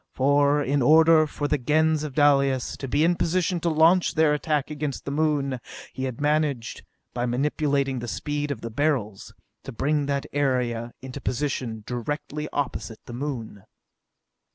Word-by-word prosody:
For, 145 +2 +3
in 140 +1 +1
order 155 +3 +6
for 145 0 -3
the 150 0 0
Gens 155 +4 +2
of 145 -4 -6
Dalis 140 -3 +3
to 135 - -5
be 145 +4 +1
in 170 +2 +4
position 175 +1 0
to 170 - 0
launch 165 +3 +4
their 160 -2 +4
attack 150 -1 -1
against 150 -2 -4
the 140 - -3
Moon, 145 -3 0 0.3
he 130 - -3
had 130 -3 -5
managed, 145 -5 -1 0.3
by 120 0 -1
manipulating 140 +1 0
the 120 - -6
speed 145 +4 -3
of 135 -5 -4
the 115 - -6
Beryls, 120 -7 -1 0.3
to 135 - -8
bring 145 +4 0
that 140 -1 -1
area 125 -4 -1
into 130 +1 -7
position 125 -5 -3
directly 145 +5 -4
opposite 125 -5 -4
the 120 - -9
Moon. 120 -6 -5
145 Hz, 160 wpm, -25 LUFS, 130-150 Hz, 0.3 s, order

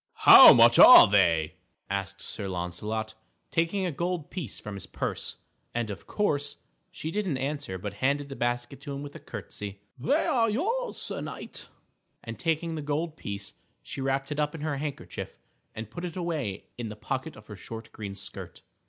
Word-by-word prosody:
_" - - -69
"How - - +10
much - - +6
are - - +11
they?" 85 -6 +2 0.3
asked 100 -1 -4
Sir 100 - -5
Launcelot, 100 +5 -4 0.4
taking 170 +4 0
a 180 - -1
gold 170 +1 -3
piece 175 -9 -5
from 105 - -7
his 100 - -7
purse. - - -4 0.4
And 120 -3 -1
of 100 - -9
course, 145 -8 0 0.3
she 160 - -6
didn't 190 -7 -1
answer 135 -8 -3
but 100 +2 -6
handed 140 +2 +1
the 135 - -8
basket 120 +2 -2
to 140 0 -6
him 140 - -6
with 145 0 -9
a - - -8
curtsy. 100 -1 -7 0.2
"They 135 - +1
are 230 -3 +2
yours, 445 - -1
Sir - - -3
Knight," - - -7 0.6
and, - - -8
taking 165 0 -1
the 155 - -4
gold 150 +2 -2
piece, 100 -6 -6 0.3
she 135 - -6
wrapped 135 +1 -1
it 150 - -3
up 150 +1 0
in 155 - -7
her 150 -2 -2
handkerchief 145 -1 -6 0.4
and 110 0 -7
put 175 - -7
it 175 -2 -5
away 155 - -3
in 115 -2 -4
the 105 - -7
pocket 130 +8 -4
of 110 - -14
her 105 - -9
short 110 +3 -9
green 100 -2 -7
skirt. - - -9
135 Hz, 190 wpm, -28 LUFS, 105-160 Hz, 0.6 s, are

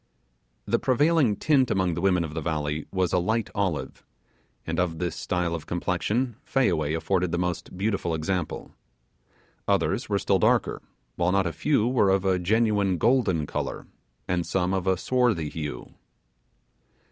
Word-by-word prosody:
The - - +1
prevailing 145 -3 +3
tint 135 -2 +2
among 95 -3 +1
the 85 - -3
women 90 -3 +3
of 75 -2 -6
the 80 - -3
valley 75 -1 -2
was 95 -3 0
a 90 - +4
light 110 +5 -1
olive, 95 -7 -2 0.6
and 80 +1 -2
of 85 -2 0
this 85 0 -2
style 90 -1 -1
of 80 -3 -5
complexion 105 +7 -1
Fayaway 80 - +1
afforded 90 +1 0
the 85 - 0
most 90 0 -3
beautiful 95 -4 -1
example. 80 +1 -3 1.0
Others - - +1
were - - +2
still - - +1
darker; - - +2 0.4
while 85 +1 +2
not 95 0 +2
a 85 - -2
few 115 - +1
were 120 -6 +3
of 95 0 +2
a 95 -1 +2
genuine 100 -1 +2
golden 110 - +2
colour, - - -4 0.4
and 90 -1 0
some 95 0 0
of 95 -1 -1
a 95 -1 +3
swarthy 120 -9 +1
hue. 75 -2 -6
90 Hz, 160 wpm, -26 LUFS, 85-105 Hz, 1.0 s, a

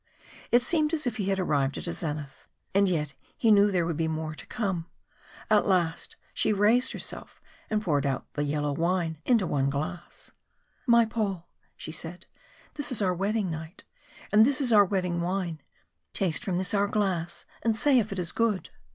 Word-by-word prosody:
It 240 0 +5
seemed 310 +2 +2
as 305 - 0
if 240 -3 -2
he 200 - -2
had 195 0 0
arrived 140 -6 0
at - - -6
a 170 - -3
zenith, 150 -4 -5 0.3
and 200 0 +4
yet 150 -5 -1 0.2
he 225 - +3
knew 205 0 +6
there 180 -4 +1
would 165 -2 -2
be 165 -1 0
more 155 -1 -3
to - - -12
come. 190 -6 -3 0.6
At 215 -1 +3
last 175 -4 0 0.2
she - - +2
raised 215 +5 +3
herself - - -7 0.3
and 215 0 0
poured 145 -6 +1
out 135 - -2
the 145 - -1
yellow 145 0 -1
wine 165 0 -1
into 230 -6 +3
one 140 -4 0
glass. 155 +5 -6 0.6
"My 235 -1 +6
Paul," 200 -6 -3 0.3
she - - -6
said, 165 +2 -4 0.5
"this 290 -1 0
is 220 -4 +2
our 185 -2 +2
wedding 200 +1 -1
might, 160 +3 -8 0.5
and 210 +1 +7
this 280 +4 +3
is 255 -5 +5
our 205 -1 +7
wedding 180 -3 -1
wine. 175 -3 -2 0.5
Taste 185 -1 +1
from 190 -6 -1
this 185 +1 +2
our 200 0 +2
glass 180 -5 -1 0.2
and 225 -1 +1
say 270 +2 +4
if 215 -2 -2
it 195 - -4
is 180 -2 -1
good." 225 -5 -1
185 Hz, 190 wpm, -27 LUFS, 165-215 Hz, 0.6 s, and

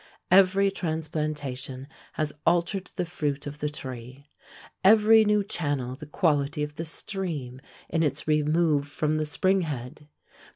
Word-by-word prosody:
Every 195 +1 +5
transplantation 150 -6 -3 0.3
has 155 -1 -2
altered 175 +3 +1
the 180 - -1
fruit 150 -5 -3
of 145 0 -7
the 150 - -1
tree; 130 0 -9 0.5
every 220 +2 +7
new 210 -1 +2
channel 145 -9 -2
the 145 +3 -10
quality 150 -2 +1
of 150 0 -4
the 165 - -3
stream 160 -8 -5 0.3
in 165 - 0
its 145 -2 -1
remove 150 -1 +2
from 150 +2 -1
the 155 0 -1
spring 185 +6 +2
head. 145 -2 -6
150 Hz, 135 wpm, -26 LUFS, 145-175 Hz, 0.5 s, every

